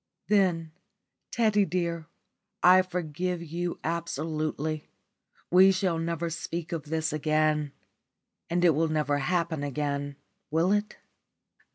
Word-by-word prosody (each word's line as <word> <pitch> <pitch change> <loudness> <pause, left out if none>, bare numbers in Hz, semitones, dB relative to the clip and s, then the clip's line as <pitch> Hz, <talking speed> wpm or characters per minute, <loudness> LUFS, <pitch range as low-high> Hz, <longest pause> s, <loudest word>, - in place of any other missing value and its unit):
"Then, 180 -6 +2 0.6
Teddy 215 -3 +3
dear, 170 -3 -2 0.6
I 185 +1 +8
forgive 180 -1 -3
you 170 +2 -4
absolutely. 155 -2 -3 0.6
We 190 +2 +7
will 180 -4 0
never 170 0 -2
speak 165 0 -5
of 165 -3 -3
this 160 +1 -1
again. 155 -1 +1 0.8
And 175 +1 +2
it 170 - +7
will 160 +2 +1
never 150 -2 0
happen 165 +1 0
again, 145 0 -2 0.3
will 165 +5 +2
it?" 210 +1 0
165 Hz, 110 wpm, -28 LUFS, 155-175 Hz, 0.8 s, I